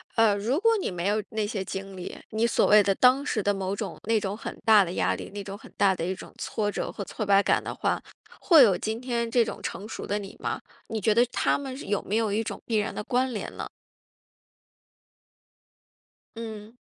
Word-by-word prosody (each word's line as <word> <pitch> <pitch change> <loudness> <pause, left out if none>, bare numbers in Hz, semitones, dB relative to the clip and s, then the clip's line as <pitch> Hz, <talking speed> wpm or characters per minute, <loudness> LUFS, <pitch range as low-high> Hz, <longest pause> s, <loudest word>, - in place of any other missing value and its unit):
呃， 225 -3 +5
如 230 +9 0
果 455 +2 +4
你 390 - -2
没 180 0 -3
有 210 +1 +2
那 220 -1 -1
些 205 -2 -3
经 195 +1 -6
历， 180 - -7
你 220 +2 +1
所 - - +3
谓 210 0 +7
的 195 -1 +1
当 260 +5 +4
时 220 -7 -1
的 205 - +2
某 195 0 -2
种 - - -5
那 225 0 +3
种 200 -1 -3
很 220 - -7
大 215 -2 +7
的 170 - -5
压 - - +1
力， - - -8
那 205 -1 -5
种 195 0 -7
很 - - -15
大 200 -1 +4
的 170 - -3
一 185 +2 -2
种 - - -11
挫 205 -1 -2
折 - - -3
和 200 - -5
挫 215 - -5
败 200 0 +5
感 - - +2
的 - - -4
话， - - 0 0.4
会 325 -7 +7
有 195 -6 +4
今 220 +4 -3
天 235 -2 -1
这 235 +1 +4
种 225 - -6
成 205 - -5
熟 - - -6
的 205 - 0
你 195 -1 -9
吗？ - - -3 0.3
你 220 -1 -3
觉 215 +2 +3
得 235 +3 +5
它 - - +2
们 270 -2 -6
有 205 -1 0
没 205 - -2
有 220 -2 +1
一 215 +3 0
种 - - -6
必 225 - 0
然 210 +1 -1
的 - - -3
关 255 +2 0
联 210 - -5
呢？ - - -4 2.7
嗯。 220 0 -8
215 Hz, 245 characters per minute, -27 LUFS, 200-230 Hz, 2.7 s, 谓